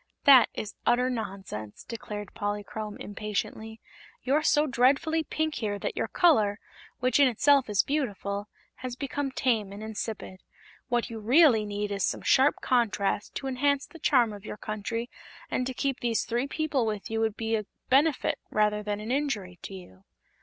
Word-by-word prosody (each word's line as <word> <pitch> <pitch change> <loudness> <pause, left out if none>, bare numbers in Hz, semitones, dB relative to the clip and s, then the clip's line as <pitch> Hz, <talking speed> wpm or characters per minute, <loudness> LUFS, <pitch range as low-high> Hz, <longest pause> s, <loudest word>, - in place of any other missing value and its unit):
"That 270 -3 +8
is 210 - -5
utter 250 +2 +2
nonsense," 195 - -6
declared 210 -3 -7
Polychrome, 205 +1 -4
impatiently. 215 +2 -4 0.4
"You're 275 +4 +2
so 300 0 +3
dreadfully 280 +5 +2
pink 315 0 -2
here 205 -3 -2
that - - -4
your - - -1
color, 220 - +3 0.4
which 255 +3 +2
in 280 - +7
itself 265 +2 +3
is 205 -1 +3
beautiful, 205 -8 -2 0.3
has 255 -1 -5
become 275 +1 -3
tame 225 -7 0
and 205 +2 -8
insipid. 215 -3 -5 0.5
What 240 -1 0
you 225 - -5
really 240 -1 +5
need 205 0 -3
is 200 -1 -1
some - - -1
sharp 270 +3 +4
contrast 210 -5 0
to - - -4
enhance 280 +2 +1
the 330 - -14
charm 245 -7 +3
of 205 -1 -10
your 215 - -7
country, 215 +3 -4 0.4
and 255 - 0
to 260 - -3
keep 275 -1 -1
these 235 -2 0
three 240 +4 -1
people 290 -5 0
with 210 0 -4
you 225 - 0
would 220 -2 0
be 225 0 0
a 215 -2 -3 0.2
benefit 285 +2 +3
rather 210 0 +1
than 210 0 -3
an 215 +3 -5
injury 215 - -2
to 195 - -7
you." 95 - -13
225 Hz, 170 wpm, -28 LUFS, 205-265 Hz, 0.5 s, That